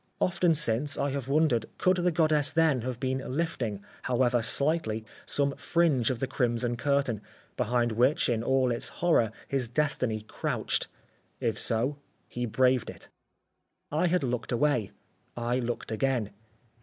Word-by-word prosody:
Often 175 -2 +2
since 140 0 +1
I 140 - 0
have 135 -2 -4
wondered 140 -6 +2
could 185 0 +3
the 180 0 +2
goddess 155 -3 +3
then 155 -4 +2
have 125 0 -4
been 130 0 -1 0.2
lifting, 120 -12 -2 0.2
however 125 -1 +2
slightly, 115 -2 0 0.2
some 140 -1 0
fringe 155 -9 +2
of 130 - -1
the 135 - -1
crimson 120 -2 0
curtain, 140 -4 0 0.3
behind 120 +1 +1
which, 125 +6 +3
in 115 -2 0
all 130 +1 +2
its 120 - -1 0.2
horror, 120 -10 +4 0.2
his 135 -3 -1
destiny 125 -4 0
crouched. 110 - -2 0.5
If - - -1
so, 125 +6 0 0.3
he 120 0 -3
braved 130 +2 +2
it. - - -11 0.8
I 155 +4 +2
had 175 -2 +1
looked 125 -3 -2
away. 125 -5 +1 0.5
I 120 +1 0
looked 120 -2 -3
again. 120 -2 0
130 Hz, 145 wpm, -28 LUFS, 120-150 Hz, 0.8 s, horror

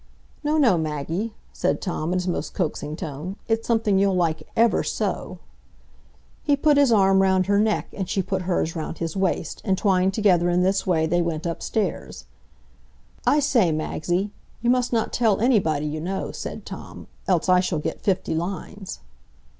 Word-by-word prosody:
"No, 300 +1 +1
no, 235 - +4
Maggie," 160 +8 -3 0.2
said - - 0
Tom, 170 -3 -3
in 185 - +1
his 180 0 -2
most 175 - -3
coaxing 155 -4 -2
tone; 160 +3 -6
"It's 225 0 0
something 220 -4 +2
you'll 195 -1 +3
like 165 -3 +1
ever 230 +1 +4
so." - - -3 1.0
He 290 - +2
put 295 +1 +3
his 280 -4 +5
arm 195 -3 +5
round 190 -1 +3
her 200 +1 +2
neck, 215 0 +1
and 190 -2 -4
she 195 -1 0
put 190 +1 -2
hers 175 -2 -1
round 160 0 -4
his 165 0 -3
waist, 190 -4 -1
and 190 -4 +1
twined 190 -2 +2
together 180 -5 +3
in 175 +1 +2
this 190 +1 +1
way, 160 -3 +2
they 175 +2 +1
went 165 -1 -2
upstairs. 190 +5 -3 1.0
"I 295 - +5
say, 240 - +3
Magsie, 175 +5 -1 0.3
you 240 - +4
must 250 -1 +1
not 230 -2 0
tell 225 -5 +2
anybody, 185 - +2
you 155 +1 -3
know," 190 +4 -3
said - - -7
Tom, - - -9 0.2
"else 180 -4 +2
I 180 0 +5
shall 180 -2 0
get 155 +2 -4
fifty 190 -5 0
lines." 185 - -5
190 Hz, 175 wpm, -24 LUFS, 170-210 Hz, 1.0 s, his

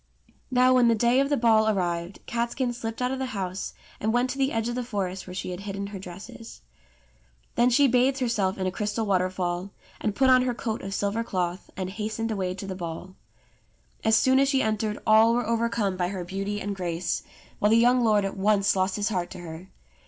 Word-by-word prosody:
Now 255 0 +4
when 250 -2 +5
the 230 - +4
day 235 +3 +3
of 275 0 +2
the 290 - +2
ball 220 -2 +4
arrived, 175 -2 -2
Catskin 240 +1 -1
slipped 225 0 -4
out 250 - 0
of 265 - -3
the 265 - -2
house 185 0 -4 0.2
and 220 - 0
went 245 +2 +1
to 275 - -6
the 270 +1 +2
edge 225 0 -1
of 240 - -2
the 250 +1 -2
forest 195 -6 -4
where 180 - -7
she 185 - -4
had 180 - -5
hidden 200 0 -5
her 195 - -5
dresses. 190 - -10 0.9
Then 240 +1 +3
she 275 +3 +5
bathed 255 +2 +3
herself 225 -7 0
in 190 - -2
a 185 - 0
crystal 210 +2 -2
waterfall, 185 -1 -1 0.3
and 210 -2 -2
put 265 +2 +4
on 255 0 +6
her 250 -1 -1
coat 225 -3 -3
of 195 +1 -4
silver 205 +4 -1
cloth, 180 -4 -3
and 185 -1 -2
hastened 220 +3 -3
away 185 -3 -2
to 195 - -7
the 195 - -4
ball. 180 +1 -6 0.9
As 220 0 +4
soon 260 +3 +4
as 275 0 +3
she 270 -2 +2
entered 215 -1 -1
all 220 +1 +6
were 245 -1 0
overcome 230 -4 0
by 180 -1 0
her 185 -1 -4
beauty 195 +3 -3
and 205 0 -3
grace, 175 -2 -2 0.4
while 210 - +3
the 225 - +5
young 245 +1 +4
lord 210 -3 +3
at 195 - -3
once 200 0 +2
lost 190 0 +1
his 205 +1 0
heart 180 -4 -2
to - - -9
her. 170 +2 -9
210 Hz, 220 wpm, -26 LUFS, 190-235 Hz, 0.9 s, on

